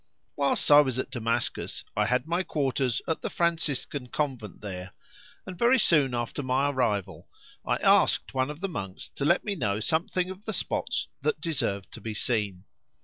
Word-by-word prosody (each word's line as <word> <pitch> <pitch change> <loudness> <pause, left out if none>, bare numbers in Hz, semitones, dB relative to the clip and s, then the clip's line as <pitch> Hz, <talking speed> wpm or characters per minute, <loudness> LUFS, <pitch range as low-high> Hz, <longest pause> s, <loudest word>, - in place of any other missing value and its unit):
Whilst 140 +1 +1
I 145 0 +10
was 130 -4 -1
at 130 - -3
Damascus 115 -1 -2
I - - +2
had 125 +2 +1
my 170 +3 0
quarters 135 -7 0
at 160 - -1
the - - -2
Franciscan 150 -6 -1
convent 125 -7 -3
there, 95 -2 -6 0.5
and 185 - -7
very 240 +7 +4
soon 150 - +3
after 120 +4 -2
my 135 +2 +1
arrival 110 -8 -1 0.3
I - - +1
asked - - +3
one 130 +1 +1
of 150 +3 -7
the 195 - 0
monks 95 - -5
to 140 - -4
let 175 +4 +3
me 205 - -1
know 105 - -1
something 175 - 0
of 190 +3 -11
the 220 - -2
spots - - -1
that 455 - 0
deserved 120 - -2
to - - -10
be 110 -2 -5
seen. 105 -5 0
135 Hz, 180 wpm, -28 LUFS, 115-165 Hz, 0.5 s, I